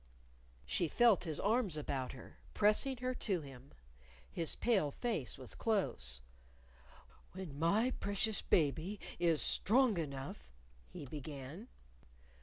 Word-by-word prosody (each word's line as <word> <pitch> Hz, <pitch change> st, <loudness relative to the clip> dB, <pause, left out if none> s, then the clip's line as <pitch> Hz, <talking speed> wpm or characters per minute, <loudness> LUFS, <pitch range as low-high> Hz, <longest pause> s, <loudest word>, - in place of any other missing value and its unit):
She 170 Hz, -, +2 dB
felt 220 Hz, +3 st, +4 dB
his 155 Hz, -3 st, -1 dB
arms 205 Hz, -5 st, +1 dB
about 135 Hz, -3 st, -3 dB
her, 130 Hz, -, -12 dB, 0.2 s
pressing 215 Hz, +6 st, +3 dB
her 255 Hz, +1 st, -2 dB
to 195 Hz, -8 st, 0 dB
him. 135 Hz, -2 st, -11 dB, 0.6 s
His 165 Hz, -3 st, -2 dB
pale 200 Hz, -11 st, +2 dB
face 165 Hz, -, -2 dB
was 130 Hz, -2 st, -7 dB
close. 65 Hz, -, 0 dB, 1.1 s
"When 180 Hz, -7 st, -7 dB
my 210 Hz, +10 st, +3 dB
precious 205 Hz, +1 st, 0 dB
baby 165 Hz, +6 st, +1 dB, 0.2 s
is 165 Hz, -3 st, +3 dB
strong 230 Hz, -3 st, +3 dB
enough 135 Hz, -, -5 dB, 0.2 s
," -, -, -28 dB
he 145 Hz, -, -7 dB
began. 145 Hz, -, -7 dB
165 Hz, 120 wpm, -36 LUFS, 140-215 Hz, 1.1 s, felt